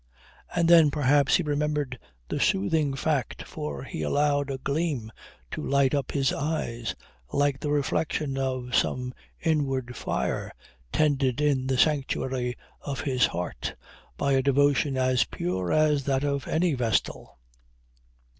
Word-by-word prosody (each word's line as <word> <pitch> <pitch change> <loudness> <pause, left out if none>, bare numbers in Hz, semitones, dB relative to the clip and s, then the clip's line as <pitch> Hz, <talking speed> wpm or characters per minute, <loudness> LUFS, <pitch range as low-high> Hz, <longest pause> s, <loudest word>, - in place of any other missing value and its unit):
And 170 -1 +3
then 165 -3 +7
perhaps 145 -1 +3
he 180 - +2
remembered 145 -3 -1 0.3
the - - -2
soothing 140 +8 +1
fact 135 -3 -1
for 70 -3 -6
he - - -6
allowed 145 - +1
a 135 - -2
gleam 140 -4 -2 0.4
to - - -4
light 140 -1 +2
up 140 -3 -1
his 135 -2 +1
eyes, 120 -6 -2 0.4
like 140 -1 +1
the 150 - -3
reflection 145 0 0
of 130 -2 -2
some 125 0 0 0.3
inward 135 -6 0
fire - - -2 0.4
tended 140 -4 +2
in 140 -3 +1
the 130 -1 +1
sanctuary 130 -4 +1 0.3
of 140 -2 -4
his 130 -3 +2
heart 90 +1 -4 0.4
by 140 - 0
a 135 -1 +4
devotion 140 0 +2
as 130 -2 +3
pure 90 -2 -3
as 150 -3 +3
that 135 -1 +1
of 140 -1 -1
any 170 0 +1
vestal. 120 -5 -1
140 Hz, 135 wpm, -27 LUFS, 130-145 Hz, 0.4 s, then